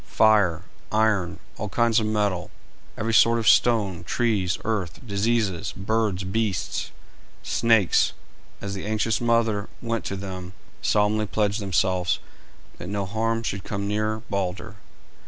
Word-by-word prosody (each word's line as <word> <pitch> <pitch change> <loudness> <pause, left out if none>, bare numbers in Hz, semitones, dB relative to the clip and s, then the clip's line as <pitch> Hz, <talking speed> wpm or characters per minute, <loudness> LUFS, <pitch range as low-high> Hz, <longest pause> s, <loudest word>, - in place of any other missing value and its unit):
Fire, 105 -7 +3 0.3
iron, 105 -5 +1 0.2
all 105 - -3
kinds 115 +3 +3
of 110 - -1
metal, 105 -3 0 0.5
every 115 +1 -1
sort 115 +1 +6
of 115 -3 -1
stone, 100 -9 +3
trees, 95 -3 0
earth, 105 -7 -2
diseases, 100 -4 0
birds, 105 -1 0
beasts, 100 -1 -2 0.5
snakes, 115 -6 +3 0.5
as 100 0 -4
the 95 - -5
anxious 110 +2 0
mother 115 -3 +1
went 115 -2 -2
to 95 - -3
them, 95 -1 -7 0.3
solemnly 105 +1 +2
pledged 105 +2 0
themselves 95 -2 +1 0.6
that 90 - -7
no 100 -1 -2
harm 115 +3 -1
should 100 -4 -3
come 100 -1 -3
near 110 +1 -1
Balder. 95 -3 -3
105 Hz, 130 wpm, -25 LUFS, 95-110 Hz, 0.6 s, sort